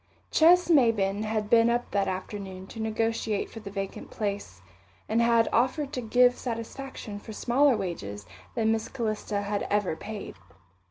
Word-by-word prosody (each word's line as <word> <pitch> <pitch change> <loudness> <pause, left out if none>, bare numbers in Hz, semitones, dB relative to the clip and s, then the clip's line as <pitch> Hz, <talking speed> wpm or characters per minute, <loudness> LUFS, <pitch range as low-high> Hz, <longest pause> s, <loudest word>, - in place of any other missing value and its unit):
Ches 355 +3 +6
Maybin 225 - +3
had 215 -1 -1
been 230 +1 +5
up 240 +1 -1
that 200 -1 +1
afternoon 190 0 -5
to 225 - -10
negotiate 220 -1 -1
for 225 - -8
the 210 -2 -8
vacant 195 -1 -5
place, 200 - -4 0.4
and 225 +2 +2
had 235 -1 +4
offered 265 +4 +1
to 250 - -2
give 245 +2 +4
satisfaction 230 -2 -6
for 220 - -9
smaller 255 +3 +3
wages 105 - -5 0.3
than 220 0 +2
Miss 225 0 -1
Calista 215 -4 -2
had 205 0 -2
ever 205 -5 +1
paid. 210 - -7
220 Hz, 155 wpm, -27 LUFS, 200-235 Hz, 0.4 s, Ches